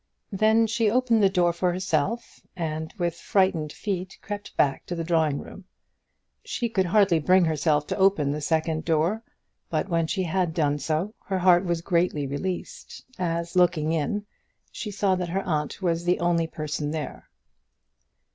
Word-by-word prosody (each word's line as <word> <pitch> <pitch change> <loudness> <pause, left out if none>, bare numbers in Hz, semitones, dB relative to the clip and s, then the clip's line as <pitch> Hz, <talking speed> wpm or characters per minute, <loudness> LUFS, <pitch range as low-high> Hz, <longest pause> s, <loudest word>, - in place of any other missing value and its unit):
Then 220 +3 +3
she 225 0 +1
opened 235 -1 +2
the 195 - +5
door 175 -3 +2
for 180 +1 0
herself, 180 +5 -2
and 160 -2 -3
with 175 -2 0
frightened 175 -3 +1
feet 190 -1 -4
crept 205 0 -7
back 135 -2 +2
to 175 - -3
the 165 - -3
drawing 160 -4 +1
room. 195 - -10 0.8
She 235 -2 -2
could 190 -4 +1
hardly 190 -3 +4
bring 185 +3 +4
herself 150 -1 +1
to - - -3
open 190 -8 +3
the 150 +1 -3
second 160 +1 0
door; 165 +7 +1 0.5
but - - -1
when 165 -2 +1
she 190 +3 -1
had 175 -1 -1
done 145 -3 +1
so, 155 +8 -1
her 190 - 0
heart 180 0 +4
was 170 -2 -1
greatly 170 -4 +1
released, 175 +7 -5
as, 170 -1 -2
looking 175 -4 +3
in, 165 +6 -1 0.5
she 215 - -5
saw 200 -1 +1
that 180 -2 -2
her 195 +3 -1
aunt 155 +1 -2
was 170 -1 0
the 175 +1 +1
only 170 -1 +1
person 150 -2 -4
there. 155 -2 -5
175 Hz, 165 wpm, -25 LUFS, 160-190 Hz, 0.8 s, the